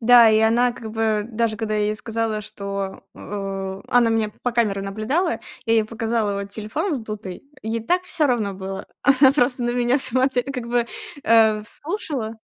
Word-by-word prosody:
Да, 235 -1 +7
и 215 - +4
она 240 +2 +3
как 225 -2 -8
бы 220 -2 +1
даже 225 -1 -1
когда 220 -1 -2
я 210 - +1
ей 210 - 0
сказала, 225 -1 -2
что, 200 -1 -6
э 195 -1 -5
она 240 -2 +4
меня 225 -1 +1
по 245 - -1
камерам 205 -4 0
наблюдала, 220 - -1 0.4
я 225 - +3
ей 220 -1 +3
показала 225 -2 -1
вот 200 - -7
телефон 225 - -3
вздутый, 215 -7 -6 0.2
ей 225 +1 -2
так 355 +10 +1
всё 315 -4 +1
равно 225 -6 0
было. 190 0 -6 0.2
Она 270 -1 +6
просто 250 -3 +1
на 240 - +1
меня 245 +2 +2
смотре 260 0 +4
как 260 -3 -5
бы, 240 -1 +1 0.4
э, 220 -1 +5
в - - -14
слушала 290 - -3
225 Hz, 185 wpm, -22 LUFS, 215-245 Hz, 0.4 s, Да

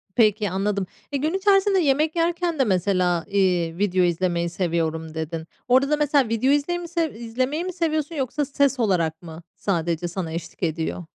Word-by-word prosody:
Peki, 215 -3 +3
anladım. 195 +1 -1 0.3
E, 280 - 0
gün 310 +5 -1
içerisinde 390 0 +3
yemek 305 +1 +2
yerken 340 -1 0
de - - +5
mesela, 180 -4 +1
iii, 180 -4 +1
video 190 -2 +2
izlemeyi 175 0 0
seviyorum 160 -2 -2
dedin. 160 0 -4 0.2
Orada 260 +3 +4
da 300 - +3
mesela 285 -4 +2
video 230 +4 +2
izley 290 +5 +1
mi 345 - -7
sev 335 -3 -1
izlemeyi 255 +7 -2
mi 365 0 -4
seviyorsun 315 -2 -1
yoksa 280 +1 -1
ses 275 -1 +1
olarak 170 -8 +1
mı 165 0 -10
sadece 170 -2 -1
sana 175 -2 -4
eşlik 165 +2 -7
ediyor? 165 +1 -2
210 Hz, 170 wpm, -23 LUFS, -, 0.3 s, de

